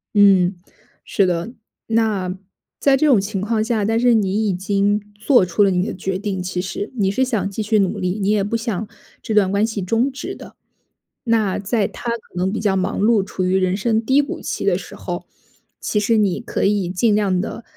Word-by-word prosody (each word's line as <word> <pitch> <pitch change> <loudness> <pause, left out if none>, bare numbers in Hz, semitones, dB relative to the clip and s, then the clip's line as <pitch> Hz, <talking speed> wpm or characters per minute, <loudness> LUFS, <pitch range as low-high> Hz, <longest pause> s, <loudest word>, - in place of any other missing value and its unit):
嗯。 195 -2 +5 0.5
是 195 - +2
的。 180 +4 -1 0.4
那 215 -5 0 0.5
在 275 -1 +4
这 310 - +2
种 265 -8 +5
情 200 0 -3
况 215 +1 0
下， 220 -2 0
但 225 +2 +1
是 245 0 +4
你 210 0 +1
已 195 - +1
经 200 +2 +1 0.2
做 215 0 +3
出 180 +4 -1
了 200 - +4
你 180 0 +1
的 - - -4
决 190 0 -3
定 195 -2 -3
其 180 0 -3
实， 190 +3 -5
你 195 -3 +2
是 260 +6 +1
想 215 -7 -1
继 215 - -4
续 215 +1 +1
努 195 -2 0
力， 180 +2 -1
你 195 0 0
也 210 -1 +2
不 210 +3 -1
想 220 -3 -3 0.3
这 220 - -3
段 195 -3 +4
关 200 +2 +2
系 220 -3 -4
终 230 +8 +1
止 265 - -6
的。 - - -12 0.7
那 220 -5 +1
在 205 +1 0
他 240 - -6
可 230 -5 -7
能 180 +2 0
比 220 - -3
较 205 -2 +1
忙 185 0 -1
碌、 210 -1 +3
处 185 -1 -3
于 185 +1 +1
人 185 0 +1
生 220 +1 0
低 265 +5 +4
谷 285 - -6
期 - - -4
的 - - +3
时 - - -10
候， - - -5 0.5
其 210 - -1
实 225 +2 +2
你 200 -4 +1
可 - - -2
以 200 -3 +1
尽 205 +4 +2
量 195 -3 +1
地 225 +4 -5
205 Hz, 235 characters per minute, -20 LUFS, 190-225 Hz, 0.7 s, 嗯